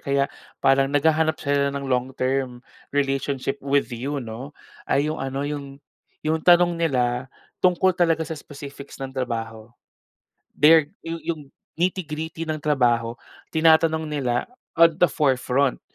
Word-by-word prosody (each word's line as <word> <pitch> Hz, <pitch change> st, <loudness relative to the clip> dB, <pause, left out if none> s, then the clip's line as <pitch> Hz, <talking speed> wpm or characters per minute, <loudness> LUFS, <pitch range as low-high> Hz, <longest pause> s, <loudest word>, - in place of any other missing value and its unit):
kaya 140 Hz, 0 st, +1 dB, 0.3 s
parang 135 Hz, 0 st, +3 dB
naghahanap 160 Hz, +2 st, +2 dB
sila 140 Hz, -1 st, +1 dB
ng 140 Hz, 0 st, -4 dB
long-term 130 Hz, 0 st, -1 dB, 0.3 s
relationship 135 Hz, 0 st, -1 dB
with 140 Hz, -3 st, 0 dB
you, 135 Hz, +5 st, -3 dB
'no. 125 Hz, +4 st, -8 dB, 0.3 s
Ay 150 Hz, +3 st, +2 dB
yung -, -, -6 dB
ano, 135 Hz, +1 st, -3 dB
yung 140 Hz, -2 st, -5 dB, 0.5 s
yung 160 Hz, +1 st, +1 dB
tanong 175 Hz, 0 st, +4 dB
nila 125 Hz, -4 st, 0 dB, 0.3 s
tungkol 185 Hz, +1 st, +3 dB
talaga 165 Hz, -2 st, +1 dB
sa 160 Hz, -, -6 dB
specifics 145 Hz, -1 st, -10 dB
ng 135 Hz, -1 st, -6 dB
trabaho. 115 Hz, -3 st, -4 dB, 0.8 s
Their 155 Hz, +1 st, +5 dB
yu 165 Hz, 0 st, -5 dB
yung 165 Hz, -2 st, -2 dB, 0.4 s
nitty-gritty 165 Hz, -3 st, -2 dB
ng 155 Hz, -1 st, -3 dB
trabaho, 120 Hz, -6 st, +1 dB, 0.3 s
tinatanong 160 Hz, 0 st, +3 dB
nila 135 Hz, -5 st, -1 dB, 0.3 s
at 165 Hz, 0 st, +7 dB
the 180 Hz, -, +6 dB
forefront. 135 Hz, -2 st, +1 dB
140 Hz, 130 wpm, -23 LUFS, 130-160 Hz, 0.8 s, at